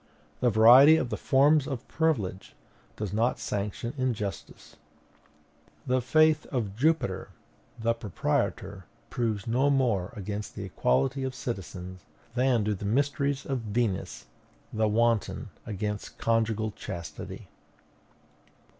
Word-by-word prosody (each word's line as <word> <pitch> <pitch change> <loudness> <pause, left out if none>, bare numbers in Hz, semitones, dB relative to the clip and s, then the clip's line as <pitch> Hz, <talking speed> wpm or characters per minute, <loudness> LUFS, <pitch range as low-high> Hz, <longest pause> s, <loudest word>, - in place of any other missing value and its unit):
The 125 - +3
variety 120 +8 +8
of 125 -6 -2
the - - 0
forms 140 +2 +3
of 135 -4 -5
privilege 115 - -1 0.4
does 105 -2 -4
not 115 +4 +1
sanction 105 +2 -3
injustice. 115 -6 -4 1.1
The 130 0 +1
faith 155 +4 +3
of 110 -8 -3
Jupiter, 140 - 0 0.5
the 115 0 +1
proprietor, 100 -3 -2 0.3
proves 110 -5 -1
no 130 +5 +2
more 120 -10 +1
against 105 +1 -5
the - - -5
equality 135 - 0
of 130 -1 -3
citizens, 95 -7 -6 0.3
than 125 -2 +2
do 105 +1 0
the 100 - -7
mysteries 140 +5 0
of 135 -2 -2
Venus, 110 -3 -2 0.5
the 110 0 +1
wanton, 115 0 +1 0.2
against 105 0 -4
conjugal 110 -1 0
chastity. 85 -4 -8
115 Hz, 115 wpm, -28 LUFS, 105-130 Hz, 1.1 s, variety